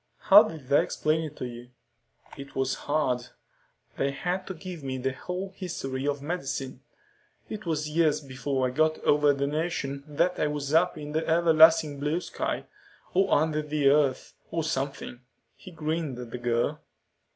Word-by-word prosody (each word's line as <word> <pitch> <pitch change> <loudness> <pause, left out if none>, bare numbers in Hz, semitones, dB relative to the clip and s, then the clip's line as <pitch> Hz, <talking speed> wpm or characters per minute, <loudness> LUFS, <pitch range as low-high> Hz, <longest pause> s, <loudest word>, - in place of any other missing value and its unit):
"How 205 +1 +8
did 155 -9 -5
they 140 - +5
explain 155 +1 0
it 150 -1 -8
to - - -5
you?" 120 0 -9 0.7
"It 140 -1 -10
was 135 0 0 0.2
hard. 130 -5 +1 0.7
They 135 - +1
had 180 +6 -3
to 190 - -5
give 175 -2 -8
me 130 -1 -3
the 130 +1 -2
whole 185 +8 -5
history 140 -8 -4
of 140 -1 -1
medicine. 135 -5 -4 0.7
It 215 -4 -6
was 155 -2 -1
years 155 -1 +2
before 135 -1 -2
I 125 - 0
got 155 +4 +2
over 145 0 +4
the 140 0 -1
notion 145 -2 -2
that 170 +5 0
I - - +2
was 145 -1 -3
up 170 +2 +3
in 150 -1 -7
the 160 +1 -1
Everlasting 160 -3 +5
Blue 150 +4 0
Sky, - - -3 0.5
or 195 +2 +2
under 155 0 +2
the 150 -2 +2
earth, 140 -2 +2 0.2
or 165 -1 -2
something." 135 -4 -3 0.4
He - - -12
grinned 160 -4 -3
at 120 -2 -8
the 125 - -5
girl. 120 -1 0
150 Hz, 170 wpm, -27 LUFS, 135-160 Hz, 0.7 s, How